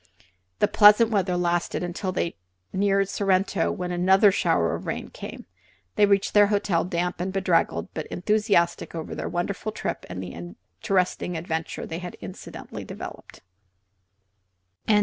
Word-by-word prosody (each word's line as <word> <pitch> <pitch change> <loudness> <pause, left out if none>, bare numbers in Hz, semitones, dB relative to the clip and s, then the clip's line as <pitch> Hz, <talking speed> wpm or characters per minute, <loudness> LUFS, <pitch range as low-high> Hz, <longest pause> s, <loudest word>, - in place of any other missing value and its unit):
The - - +3
pleasant 215 +2 +6
weather 185 -4 +1
lasted 175 0 0
until 180 +2 -3
they 175 -2 -2 0.4
neared 195 0 +2
Sorrento, 195 -2 +1
when 180 0 -4
another 190 +3 +5
shower 165 - +1
of - - -5
rain - - -4
came - - -8
up. - - -21 0.5
They 205 - +5
reached 200 -1 +2
their 205 -1 +6
hotel 200 -4 +1
damp 175 0 -2
and 185 +1 -2
bedraggled, 170 - +1
but 155 - -5
enthusiastic 200 -4 +1
over 160 -1 -5
their - - -4
wonderful 195 +5 -2
trip 215 - -4
and 90 +1 -5
the 90 - -7 0.5
interesting 180 -2 0
adventure 160 -1 -4
it - - -7
had 180 -1 -7
incidentally 95 -2 -8
developed. - - -9
180 Hz, 145 wpm, -25 LUFS, 170-200 Hz, 0.5 s, pleasant